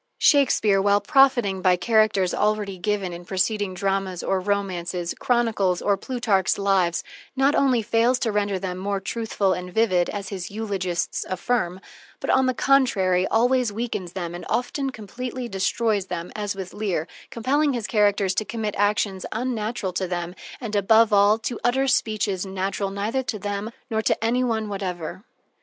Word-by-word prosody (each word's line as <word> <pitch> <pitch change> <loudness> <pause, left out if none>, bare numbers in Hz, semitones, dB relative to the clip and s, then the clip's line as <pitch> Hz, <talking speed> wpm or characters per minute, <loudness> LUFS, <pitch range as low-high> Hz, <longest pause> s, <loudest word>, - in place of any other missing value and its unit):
Shakespeare, 220 - +4
while 200 +1 +4
profiting 240 -5 +3
by 185 -1 +4
characters 210 -2 +2
already 210 -2 0
given 195 -1 -1
in 170 +1 -8
preceding 190 +1 -1
dramas, 195 -1 -1
or 190 - +1
romances, 180 -3 -2
chronicles, 220 -7 +1
or, 205 - +2
Plutarch's 205 -4 0
"Lives," 190 -4 +1 0.3
not 275 +2 +3
only 255 -6 +3
fails 230 +4 +2
to 225 - +1
render 205 -1 0
them 185 -1 -4
more 200 +1 -1
truthful 200 -1 -1
and 180 0 -5
vivid, 185 -5 +2
as 200 -2 -5
his 190 -3 -5
eulogists 195 -5 -2
affirm, 185 -1 -1 0.4
but, - - -1
on 265 0 +3
the 255 - 0
contrary, 195 -11 +3
always 245 0 +2
weakens 205 -5 -4
them 175 -3 -4
and 175 - -7
often 250 +4 -1
completely 250 +2 -6
destroys 200 0 0
them, 175 -1 -5
as 205 -2 -3
with 190 -2 -7
Lear, 195 -6 -2 0.2
compelling 280 +5 +1
his 235 -3 -3
characters 205 -3 +2
to 215 - 0
commit 215 -1 -3
actions 205 -2 +1
unnatural 225 -4 -2
to 185 +1 -1
them, 175 -1 -3 0.3
and, 225 -4 -5
above 220 +2 +4
all, 205 +1 +5
to 230 +1 -4
utter 265 +3 +2
speeches 210 -6 0
natural 195 +1 -2
neither 205 +6 -1
to 245 -4 -4
them 205 +1 -3 0.2
nor 220 -3 -1
to 220 - 0
any 245 +3 +2
one 225 -3 -1
whatever. 190 -3 -5
205 Hz, 160 wpm, -24 LUFS, 190-230 Hz, 0.4 s, all